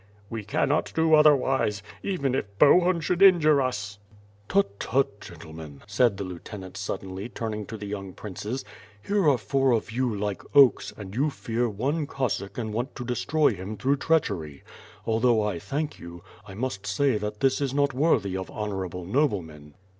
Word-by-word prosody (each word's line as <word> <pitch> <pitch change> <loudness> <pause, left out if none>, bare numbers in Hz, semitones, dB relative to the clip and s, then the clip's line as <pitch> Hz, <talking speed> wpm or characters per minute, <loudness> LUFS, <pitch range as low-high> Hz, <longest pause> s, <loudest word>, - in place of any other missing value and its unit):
"We 115 -2 -4
cannot 140 +8 0
do 160 0 +3
otherwise 135 -9 +4
— - - -24
even 155 -10 -1
if 100 -6 -3
Bohun 175 - +5
should 175 +4 -1
injure 155 -7 +6
us." 105 -6 -3 0.5
"Tut, 100 0 +1
tut! 125 -5 0
gentlemen," 80 -3 -11
said 105 0 +2
the 100 - -3
lieutenant 95 +1 -8
buddenly, 95 +3 -5
turn 115 -2 -4
ing 105 -1 -5
to 110 - -6
the 105 - -7
young 100 -2 -6
princes, 105 +6 -6 0.4
"here 200 -6 +3
are 135 - +4
four 130 +4 +1
of 110 -1 -1
you, 125 +1 0
like 105 -1 -3
oaks, 140 -3 +6
and 100 -2 -8
you 140 +7 +1
fear 120 -3 -2
one 140 +9 -1
Oossack 105 -8 -3
and 110 -3 -3
want 120 +5 -3
to 125 - -6
destroy 145 +5 +2
him 100 +3 -6
through 135 +7 +1
treachery! 100 - -1 0.4
Although 115 0 +2
I 105 -5 -2
thank 150 - -4
you, 85 0 -10 0.2
I 95 - -9
must 110 -3 -4
say 110 +4 +1
that 105 0 -5
this 135 +1 +2
is 140 -2 0
not 140 0 +1
worthy 125 - +2
of 95 0 -4
honorable 95 -4 -4
noblemen." 85 - -1
110 Hz, 175 wpm, -26 LUFS, 100-140 Hz, 0.5 s, injure